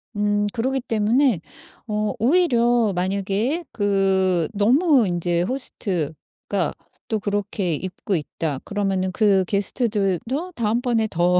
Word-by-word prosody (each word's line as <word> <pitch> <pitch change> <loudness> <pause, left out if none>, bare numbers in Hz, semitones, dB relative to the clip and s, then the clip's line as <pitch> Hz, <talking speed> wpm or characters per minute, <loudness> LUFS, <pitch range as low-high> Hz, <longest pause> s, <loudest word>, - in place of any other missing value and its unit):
음 205 0 +1
그러기 260 +3 -1
때문에 230 - +2 0.5
어 210 -1 -1
오히려 240 - +3
만약에 200 - -1
그 190 -4 +1
'너무 255 - +4
인제 175 -1 0
호스트가 185 - -2 0.3
또 220 - -1
그렇게 205 -3 -2
입고 185 +4 -3
있다.' 150 -2 -3
그러면은 195 -2 -1
그 195 -1 +3
게스트들도 210 - -1
다음번에 230 0 +1
더 175 +2 +3
205 Hz, 240 characters per minute, -22 LUFS, 185-235 Hz, 0.5 s, 너무